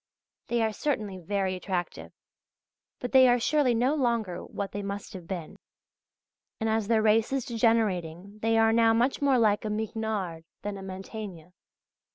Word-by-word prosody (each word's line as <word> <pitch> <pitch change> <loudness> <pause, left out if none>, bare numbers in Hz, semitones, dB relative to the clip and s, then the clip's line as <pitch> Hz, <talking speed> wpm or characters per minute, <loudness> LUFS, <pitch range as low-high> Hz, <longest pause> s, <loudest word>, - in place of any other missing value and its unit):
They 235 -1 +1
are 220 -1 0
certainly 210 -9 -2
very 190 +1 -1
attractive; 185 -1 -4 0.9
but 245 - -5
they 260 -1 +7
are 245 0 +4
surely 270 -1 +2
no 250 +5 +2
longer 235 - -1
what 200 -1 -5
they 205 - -4
must 200 +1 -6
have 180 -3 -9
been. 175 -5 -6 1.0
And 220 - -1
as 220 -2 0
their 220 -1 +3
race 220 +2 +3
is 270 -2 -1
degenerating 205 -5 0
they 225 0 +2
are 225 0 +4
now 225 0 +4
much 245 +5 +1
more 275 -2 +4
like 215 -3 +3
a 215 - -2
Mignard 210 -5 -3 0.2
than 205 0 -3
a 195 - -8
Mantegna. 190 -2 -8
220 Hz, 165 wpm, -28 LUFS, 195-230 Hz, 1.0 s, they